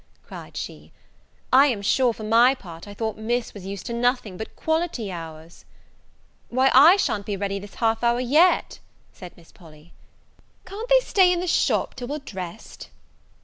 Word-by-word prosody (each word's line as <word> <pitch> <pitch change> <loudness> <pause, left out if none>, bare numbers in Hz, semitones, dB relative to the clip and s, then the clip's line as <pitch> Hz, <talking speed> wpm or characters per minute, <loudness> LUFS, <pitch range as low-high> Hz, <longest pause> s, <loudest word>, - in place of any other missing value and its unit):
cried - - -11
she: - - -8 0.6
"I 275 +3 +7
am 220 -7 -2
sure 245 +4 +2
for 220 - -9
my 235 +5 +4
part 170 -6 -12
I 205 - -10
thought 220 0 -4
Miss 240 +2 -2
was 195 -2 -10
used 195 -1 -7
to 235 - -5
nothing 245 -4 -1
but 220 +4 -8
quality 320 - -2
hours." 165 -1 -10 0.9
"Why, 260 +2 +2
I 300 +8 +8
sha'n't 210 - -2
be 205 -2 -3
ready 200 0 -3
this 200 0 -12
half 225 0 0
hour 235 0 +2
yet," 300 +9 +2 0.3
said 180 -2 -12
Miss 170 -2 -19
Polly; 160 -1 -18 0.7
"can't 430 +6 -8
they - - +6
stay 375 -6 +3
in 355 - 0
the 360 - -3
shop 345 - +1
till 245 - -7
we're 290 +3 -4
dressed?" 190 - -9
230 Hz, 175 wpm, -23 LUFS, 195-270 Hz, 0.9 s, I